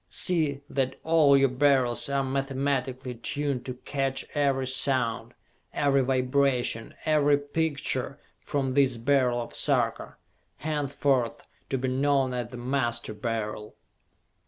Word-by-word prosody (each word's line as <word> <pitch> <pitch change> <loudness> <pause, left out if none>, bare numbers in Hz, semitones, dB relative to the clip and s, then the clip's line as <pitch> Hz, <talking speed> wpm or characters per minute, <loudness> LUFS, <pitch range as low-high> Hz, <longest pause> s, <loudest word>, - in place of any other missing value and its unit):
See 155 -6 +1
that 135 -2 -2
all 155 -4 +5
your 135 0 +4
Beryls 130 -1 +2
are 140 0 +1
mathematically 135 -1 -2
tuned 135 +2 -3
to 125 - -4
catch 135 +1 -2
every 140 -3 +1
sound, 130 -4 0 0.4
every 140 -2 +2
vibration, 130 -2 0
every 145 -2 +4
picture, 145 -2 -2 0.2
from 135 -3 -2
this 130 -2 +2
Beryl 125 0 +2
of 120 - -6
Sarka, - - 0 0.4
henceforth 140 -4 -1 0.3
to 135 - 0
be 130 +1 -2
known 135 0 +1
as 120 -2 -3
the 125 - -9
Master 120 -3 -2
Beryl! 105 -1 -4
135 Hz, 120 wpm, -27 LUFS, 125-140 Hz, 0.4 s, all